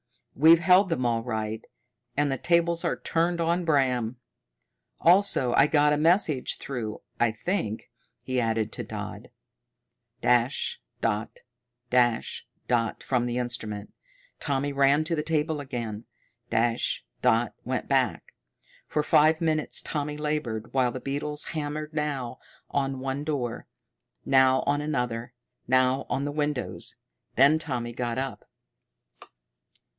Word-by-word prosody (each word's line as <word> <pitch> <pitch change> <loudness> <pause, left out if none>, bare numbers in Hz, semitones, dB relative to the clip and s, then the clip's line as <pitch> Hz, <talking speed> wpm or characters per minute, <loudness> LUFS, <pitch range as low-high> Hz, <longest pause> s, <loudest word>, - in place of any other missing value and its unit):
"We've 160 +4 +7
held 185 +2 +5
them 130 -7 -1
all 115 -1 +1
right, 110 -2 -3 0.5
and 145 -1 +2
the 135 - -1
tables 170 +2 +2
are - - -1
turned 170 +1 0
on 170 +2 +1
Bram. 130 -6 +1 0.8
Also 175 -8 +4
I 135 - +5
got 150 -1 +4
a - - +2
message 160 -4 +2
through, 115 -6 -5 0.2
I 120 -2 +3
think," 115 - -3 0.3
he 130 -1 0
added 115 -1 0
to - - -5
Dodd. - - -7 0.9
Dash 125 +2 +1 0.2
dot 110 -1 -2 0.5
dash 120 -2 +1 0.2
dot 115 -3 0
from 125 -2 0
the 120 0 -2
instrument. 110 -4 -4 0.5
Tommy 140 0 -1
ran 140 +2 +4
to 165 +1 -1
the 150 - 0
table 155 0 0
again. 120 -5 -5 0.4
Dash 115 +1 0 0.2
dot 120 -2 +2
went - - -3
back. - - 0 0.5
For 150 - 0
five 155 +2 +4
minutes 155 -2 0
Tommy 150 -1 -3
labored, 150 -8 -3
while 130 -2 +2
the 130 - -5
beetles 145 +3 -3
hammered 150 0 -4
now 140 -5 -3 0.3
on 135 -1 -1
one 135 +2 -3
door, 135 -6 -3 0.6
now 130 -1 +4
on 145 +1 +1
another, 125 -5 -2 0.3
now 130 +1 +2
on 135 +3 -1
the 145 - -2
windows. 145 -3 -2 0.4
Then 140 +4 +5
Tommy 120 -6 -3
got 120 0 -3
up. 135 0 -4
135 Hz, 130 wpm, -27 LUFS, 120-150 Hz, 0.9 s, We've